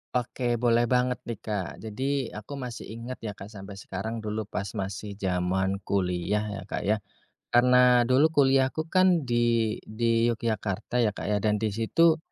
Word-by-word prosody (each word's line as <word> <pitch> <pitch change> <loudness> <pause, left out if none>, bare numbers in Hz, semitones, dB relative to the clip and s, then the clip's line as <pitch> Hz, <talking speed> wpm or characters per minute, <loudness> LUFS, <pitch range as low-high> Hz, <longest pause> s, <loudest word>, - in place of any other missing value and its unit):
Oke, 125 0 0
boleh 120 0 +2
banget 125 +1 +1
nih, 115 - -3
Kak, 105 -5 -2 0.2
jadi 130 +4 -2
aku 125 +7 -8
masih 125 -3 -6
ingat 120 +2 -7
ya, 105 -3 -6
Kak, 100 +2 -10
sampe 100 -1 -9
sekarang 105 +4 -5
dulu 105 0 -3
pas 100 - -3
masih 100 0 -5
jaman 95 +1 0
kuliah 95 +2 0
ya, 95 - -6
Kak, 95 - -4
ya. 105 - +4 0.6
Karna 125 0 +6
dulu 130 +5 +4
kuliahku 135 +1 +3
kan 185 -3 +4
di 120 -3 +1
di 115 +1 +1
Yogyakarta 110 -1 -1
ya, 105 - -1
Kak, - - -5
ya, 105 - +2
dan 105 +1 +1
di 110 - +1
situ 155 +10 +3
115 Hz, 165 wpm, -27 LUFS, 105-125 Hz, 0.6 s, Karna